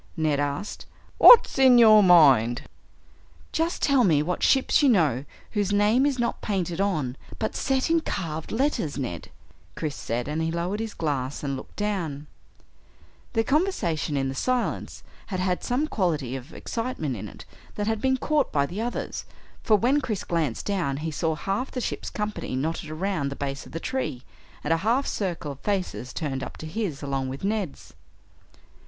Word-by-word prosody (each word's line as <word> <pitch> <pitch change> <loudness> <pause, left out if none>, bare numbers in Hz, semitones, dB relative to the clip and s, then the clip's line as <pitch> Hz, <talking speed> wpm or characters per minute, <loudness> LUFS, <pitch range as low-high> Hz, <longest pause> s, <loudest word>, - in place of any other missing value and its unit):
Ned 155 -3 +1
asked. 145 +8 -3 0.3
"What's 475 - +8
in 260 -2 +7
your 215 -2 +8
mind?" 140 - +5 0.9
"Just 330 +2 -1
tell 275 -3 +4
me 155 -7 +3
what 180 +3 -2
ships 265 +2 +3
you 285 - +5
know 150 - +2 0.3
whose 205 -2 0
name 210 +7 +3
is 275 -2 -1
not 240 -1 -1
painted 185 -3 -2
on 155 -11 -1 0.2
but 220 - -3
set 265 +3 0
in 330 - +4
carved 160 - -4
letters, 230 - 0
Ned," 120 - -5 0.5
Chris 155 -3 -3
said, 120 +2 -3
and 150 +2 -2
he 160 - 0
lowered 175 +5 -2
his 225 -1 -4
glass 140 -4 -2
and 140 -1 -2
looked 130 - -10
down. 175 -9 -2 1.1
Their 225 -1 +2
conversation, 215 - 0
in 135 -1 0
the 135 - -3
silence, 250 - -2 0.2
had 185 -3 -3
had 180 -1 -1
some 255 +5 0
quality 155 - -1
of 135 +4 -8
excitement 225 - -3
in 105 0 -6
it - - -12 0.3
that 205 - -2
had 220 0 -1
been 265 0 +2
caught 295 +1 0
by 140 -1 +2
the 185 +9 -5
others, 240 +1 -4 0.4
for 220 - +4
when 255 +8 +2
Chris 220 -7 -3
glanced 160 -9 -1
down 175 -9 -1
he 160 - -2
saw 160 +1 -1
half 195 +10 -2
the 255 - -4
ship's - - -3
company 210 -10 -4
knotted 155 +3 -2
around 160 -2 -2
the 140 - -6
base 140 -1 -5
of - - -14
the 165 - -4
tree, 255 - -3 0.4
and 150 - +2
a - - +2
half 235 +10 +1
circle 175 -7 -3
of 140 - -10
faces 185 -10 -2
turned 140 -5 -3
up - - -7
to - - -8
his, 160 -4 -4
along 135 -2 -2
with 135 +5 -7
Ned's. 200 -6 -3
180 Hz, 180 wpm, -25 LUFS, 145-225 Hz, 1.1 s, What's